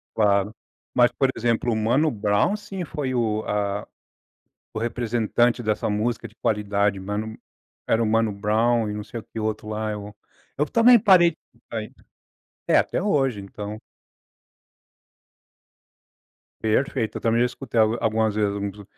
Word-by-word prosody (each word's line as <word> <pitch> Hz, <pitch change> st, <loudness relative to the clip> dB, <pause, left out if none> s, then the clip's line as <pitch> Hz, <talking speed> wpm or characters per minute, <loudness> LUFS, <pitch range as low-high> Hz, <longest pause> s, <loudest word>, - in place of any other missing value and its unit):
Claro. 105 Hz, -1 st, +2 dB, 0.4 s
Mas, 120 Hz, 0 st, +4 dB
por 135 Hz, +2 st, +1 dB
exemplo, 115 Hz, +1 st, 0 dB
o -, -, 0 dB
Mano 120 Hz, +9 st, +2 dB
Brown, 105 Hz, -, +1 dB
sim, 205 Hz, -3 st, -6 dB
foi 145 Hz, -5 st, -3 dB
o 110 Hz, -3 st, 0 dB
a 100 Hz, 0 st, -1 dB, 0.9 s
o -, -, -3 dB
representante 120 Hz, +1 st, 0 dB
dessa 110 Hz, -1 st, 0 dB
música 110 Hz, +2 st, -1 dB
de 110 Hz, -, -21 dB
qualidade. 100 Hz, -3 st, 0 dB
Mano 105 Hz, +3 st, -4 dB, 0.5 s
era 115 Hz, +1 st, +2 dB
o -, -, +1 dB
Mano 110 Hz, 0 st, +2 dB
Brown 110 Hz, +3 st, +1 dB
e -, -, -3 dB
não 105 Hz, 0 st, -5 dB
sei 110 Hz, +3 st, -7 dB
o -, -, -21 dB
quê -, -, -8 dB
o 110 Hz, -, -2 dB
outro 110 Hz, 0 st, -3 dB
lá. 110 Hz, 0 st, -2 dB
É -, -, -3 dB
o 105 Hz, 0 st, -9 dB, 0.4 s
Eu 150 Hz, -, +2 dB
também 235 Hz, 0 st, +6 dB
parei 185 Hz, -5 st, +6 dB
de 155 Hz, -, -21 dB, 0.2 s
escutar 115 Hz, -2 st, -6 dB
isso. 110 Hz, -, -15 dB, 0.6 s
É, -, -, +5 dB
até -, -, +1 dB
hoje, 135 Hz, -, +1 dB
então 105 Hz, +2 st, -7 dB, 2.8 s
Perfeito. 110 Hz, +1 st, 0 dB
Eu -, -, -14 dB
também 115 Hz, 0 st, +2 dB
já 125 Hz, -, +4 dB
escutei 120 Hz, -2 st, -2 dB
algu 110 Hz, +1 st, +3 dB
algumas 110 Hz, -1 st, +1 dB
vezes 105 Hz, -1 st, 0 dB
uns. 100 Hz, 0 st, -5 dB
110 Hz, 160 wpm, -24 LUFS, 105-120 Hz, 2.8 s, também